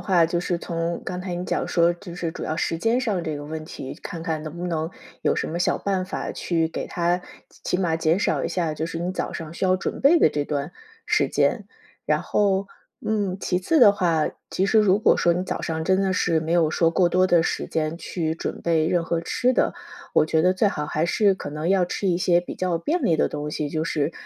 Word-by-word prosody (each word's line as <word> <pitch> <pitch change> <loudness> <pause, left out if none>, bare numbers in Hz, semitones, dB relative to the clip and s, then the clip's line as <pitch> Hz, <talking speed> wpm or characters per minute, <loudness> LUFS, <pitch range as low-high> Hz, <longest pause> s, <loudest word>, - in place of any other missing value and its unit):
话， 180 -4 +3
就 170 +1 0
是 175 0 -1
从 170 0 -3
刚 180 -1 -4
才 180 -1 -4
你 175 - -4
讲 - - -1
说， 170 0 +3
就 175 0 -10
是 170 -2 -3
主 - - -6
要 155 - -2
时 165 0 -1
间 225 +7 +2
上 210 -8 -1
这 155 -2 -3
个 145 - -7
问 155 +1 -5
题， 135 -4 -7
看 165 - -6
看 160 -2 -2
能 155 +2 -7
不 175 - -4
能 160 -1 -2 0.3
有 - - +2
什 - - -1
么 170 - -3
小 175 - +1
办 190 -2 -1
法， 185 - -4
去 165 -2 0
给 - - -5
它 175 +1 0 0.4
起 - - +1
码 175 -3 0
减 160 +2 +2
少 - - 0
一 - - 0
下 170 -4 -1
就 155 +1 -3
是 165 - -5
你 175 +2 -2
早 - - -3
上 160 -1 -6
需 170 - -3
要 185 0 +3
准 185 - -4
备 305 +5 +6
的 160 - +5
这 145 -1 -1
段 145 +2 -3 0.3
时 - - +2
间。 - - +1 0.4
然 - - +1
后， 195 -1 +1 0.4
嗯， 205 -4 0
其 180 -2 0
次 320 - +2
的 205 - +8
话， 165 -5 +1 0.2
其 190 - +1
实 220 - +4
如 200 -1 +4
果 - - +4
说 175 - +3
你 180 +2 -2
早 - - -4
上 160 -1 -2
真 190 +2 +3
的 190 -1 +1
是 165 -3 +1
没 160 +1 -4
有 170 -3 +4
说 165 +1 +2
过 175 +1 +3
多 185 +1 +3
的 170 -2 +4
时 - - -1
间 155 0 -1
去 165 -2 -3
准 - - -5
备 160 -2 +1
任 175 -1 +1
何 165 0 -1
吃 250 +9 +1
的， - - +2 0.4
我 - - +4
觉 160 0 +2
得 185 - +4
最 185 +3 +2
好 150 -7 -1
还 155 +2 -1
是 205 +2 +3
可 190 -6 -6
能 150 +3 -3
要 190 -2 +4
吃 190 +2 -2
一 175 -1 +2
些 175 -1 +3
比 175 - -8
较 180 -2 0
便 305 - -1
利 165 -7 +3
的 - - +2
东 150 0 -4
西， 150 -1 -2
就 155 +1 -1
是， 150 -1 -1
170 Hz, 270 characters per minute, -24 LUFS, 160-185 Hz, 0.4 s, 的